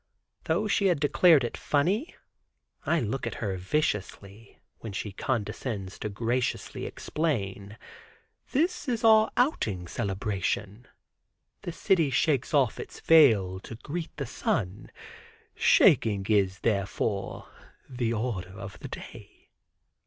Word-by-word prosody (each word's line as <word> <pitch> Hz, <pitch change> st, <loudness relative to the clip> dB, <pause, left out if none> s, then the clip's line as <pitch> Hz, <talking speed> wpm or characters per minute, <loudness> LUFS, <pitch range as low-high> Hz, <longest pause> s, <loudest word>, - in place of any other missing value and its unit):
Though 185 Hz, +7 st, +1 dB
she 200 Hz, -1 st, +2 dB
had 175 Hz, -5 st, +2 dB
declared 150 Hz, 0 st, +5 dB
it 120 Hz, -, -3 dB
funny, 190 Hz, -, 0 dB, 0.7 s
I 170 Hz, -, +3 dB
look 120 Hz, +3 st, -2 dB
at -, -, -4 dB
her 100 Hz, -4 st, -3 dB
viciously, 105 Hz, -1 st, -3 dB, 0.2 s
when 110 Hz, -3 st, -7 dB
she 105 Hz, +1 st, -4 dB
condescends 105 Hz, -2 st, -3 dB
to 105 Hz, -, -3 dB
graciously 120 Hz, +4 st, -2 dB
explain: 105 Hz, -9 st, -3 dB, 0.7 s
"This 305 Hz, 0 st, 0 dB
is 235 Hz, -1 st, -1 dB
our 220 Hz, -1 st, +6 dB
outing 105 Hz, -, 0 dB
celebration; 100 Hz, +4 st, -3 dB, 0.7 s
the 175 Hz, -, -5 dB
city 170 Hz, -3 st, +2 dB
shakes 135 Hz, -1 st, +1 dB
off 135 Hz, -6 st, +2 dB
its -, -, -8 dB
veil 110 Hz, -, +5 dB
to 110 Hz, -, -9 dB
greet 160 Hz, +9 st, -6 dB
the 140 Hz, -, -3 dB
sun; 100 Hz, -4 st, -2 dB, 0.6 s
shaking 100 Hz, -3 st, +4 dB
is, 100 Hz, -3 st, +2 dB
therefore, 100 Hz, -1 st, -2 dB, 0.4 s
the 120 Hz, -3 st, -2 dB
order 105 Hz, -5 st, -3 dB
of -, -, -8 dB
the -, -, -7 dB
day." -, -, -11 dB
115 Hz, 120 wpm, -28 LUFS, 100-155 Hz, 0.7 s, our